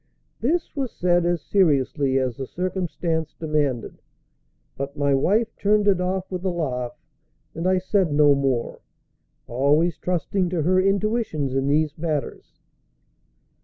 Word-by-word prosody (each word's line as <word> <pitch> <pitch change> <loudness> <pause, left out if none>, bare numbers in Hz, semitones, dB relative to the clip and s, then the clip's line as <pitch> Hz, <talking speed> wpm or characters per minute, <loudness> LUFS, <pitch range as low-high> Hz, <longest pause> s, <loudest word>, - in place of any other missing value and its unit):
This 320 +8 -1
was 270 -4 -2
said 175 -1 +1
as 175 -3 0
seriously 140 -6 +2
as 130 -3 0
the 135 +1 -6
circumstance 175 -3 -2
demanded; 150 -7 -2 0.7
but 140 +1 -5
my 140 -1 +2
wife 215 +12 +1
turned 205 0 +2
it 190 -3 +3
off 185 +1 -2
with 180 -1 -4
a 190 - 0
laugh, 125 -8 -3 0.6
and 165 +3 -2
I 185 0 +3
said 185 -2 +1
no 145 0 +5
more, 135 -4 -1 0.7
always 150 +7 +1
trusting 180 +1 -1
to 170 -3 -1
her 185 +3 +3
intuitions 195 - 0
in 135 0 0
these 150 +1 +1
matters. 155 -3 -4
165 Hz, 135 wpm, -23 LUFS, 140-185 Hz, 0.7 s, no